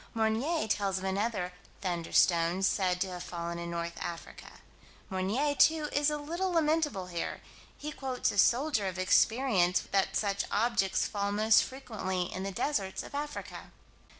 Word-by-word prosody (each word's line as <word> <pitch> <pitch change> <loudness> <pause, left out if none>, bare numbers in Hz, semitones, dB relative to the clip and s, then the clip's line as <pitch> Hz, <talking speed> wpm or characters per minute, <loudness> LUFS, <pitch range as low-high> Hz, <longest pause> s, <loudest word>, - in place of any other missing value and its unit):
Meunier 225 +7 +1
tells 200 -2 0
of 190 - -5
another 190 -1 -1 0.3
"thunderstone" 175 0 +2
said 185 -2 +2
to 190 +1 -1
have 180 -1 -6
fallen 170 -1 -5
in 170 0 -5
North 170 0 -4
Africa. 170 0 -7 0.6
Meunier, 210 +11 0
too, 310 +1 +4
is 290 +1 +3
a 300 - -1
little 340 +6 -2
lamentable 305 - +1
here: 175 -2 -4 0.4
he 300 +1 -5
quotes 265 -3 -1
a 200 - -1
soldier 240 -2 +3
of 185 -1 -4
experience 185 -1 +3
that 195 -1 +1
such 200 -2 0
objects 210 -4 +1
fall 200 -1 -2
most 215 +2 +5
frequently 215 -8 -3
in 185 - -4
the 195 +1 -3
deserts 195 -2 -2
of - - -11
Africa. 295 +1 -5
200 Hz, 150 wpm, -30 LUFS, 185-270 Hz, 0.6 s, most